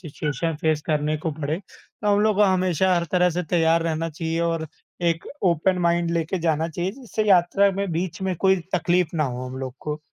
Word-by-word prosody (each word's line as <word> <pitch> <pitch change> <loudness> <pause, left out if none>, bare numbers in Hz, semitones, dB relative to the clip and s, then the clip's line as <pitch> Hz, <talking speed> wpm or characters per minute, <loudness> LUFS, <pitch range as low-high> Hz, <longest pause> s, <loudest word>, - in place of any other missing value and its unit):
Situation 155 0 -3
face 155 -1 +1
करने 150 -1 0
को 160 +2 -3
पड़े। 150 +1 -3
तो 210 +1 -12
हम 205 - +2
लोग 215 -1 +2
को 210 - +5
हमेशा 185 -2 +2
हर 170 -1 +1
तरह 180 0 +4
से 175 +2 -2
तैयार 165 -1 +3
रहना 165 0 -1
चाहिए 165 +1 -3
और 165 -1 -1 0.3
एक 170 -1 0 0.2
ओपन 180 0 +2
माइंड 170 -1 +1
लेके 170 +2 -1
जाना 160 -1 0
चाहिए। 175 +3 -2
जिससे 240 -3 -4
यात्रा 195 +2 +4
में 195 0 -2
बीच 170 +2 -3
में 190 -1 0
कोई 190 +3 +3 0.2
तकलीफ़ 175 -1 +1
ना 155 - +2
हो 125 -1 -4
हम 130 +1 -7
लोग 130 -1 -5
को। 150 0 -4
170 Hz, 205 wpm, -23 LUFS, 155-185 Hz, 0.3 s, को